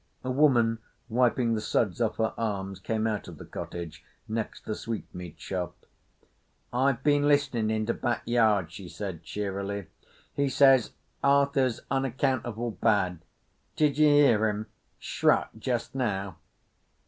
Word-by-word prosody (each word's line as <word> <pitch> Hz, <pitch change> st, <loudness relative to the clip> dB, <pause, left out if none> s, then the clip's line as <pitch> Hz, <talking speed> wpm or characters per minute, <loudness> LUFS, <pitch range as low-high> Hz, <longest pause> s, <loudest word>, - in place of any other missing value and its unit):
A 130 Hz, -, -2 dB
woman, 120 Hz, -5 st, +3 dB, 0.3 s
wiping 120 Hz, 0 st, +2 dB
the 110 Hz, -, -1 dB
suds 105 Hz, -1 st, 0 dB
off 110 Hz, -2 st, 0 dB
her 110 Hz, -1 st, 0 dB
arms, 100 Hz, -4 st, -3 dB
came 110 Hz, +3 st, -1 dB
out 110 Hz, -2 st, -2 dB
of -, -, -9 dB
the -, -, -10 dB
cottage 85 Hz, -2 st, -7 dB, 0.2 s
next 110 Hz, 0 st, -4 dB
the 110 Hz, -, -2 dB
sweetmeat 90 Hz, -8 st, -6 dB
shop. 90 Hz, 0 st, -5 dB, 0.9 s
"I've 130 Hz, +1 st, +1 dB
be'n 145 Hz, -1 st, +3 dB
listenin' 135 Hz, -7 st, +2 dB
in 110 Hz, 0 st, 0 dB
de 115 Hz, -, 0 dB
back 120 Hz, -1 st, -2 dB
yard," 110 Hz, -7 st, +2 dB
she 90 Hz, -1 st, -9 dB
said 95 Hz, -6 st, -6 dB
cheerily. 100 Hz, -1 st, -4 dB, 0.4 s
"He 140 Hz, -1 st, +1 dB
says 135 Hz, -3 st, +5 dB, 0.3 s
Arthur's 140 Hz, -3 st, +3 dB
unaccountable 130 Hz, -3 st, -1 dB
bad. 95 Hz, -5 st, +1 dB, 0.6 s
Did 150 Hz, -1 st, +2 dB
ye 155 Hz, -, +7 dB
hear 125 Hz, -7 st, +5 dB
him 105 Hz, +1 st, -3 dB, 0.3 s
shruck -, -, +1 dB
just 120 Hz, 0 st, -2 dB
now? 100 Hz, -8 st, -2 dB
115 Hz, 135 wpm, -28 LUFS, 100-130 Hz, 0.9 s, ye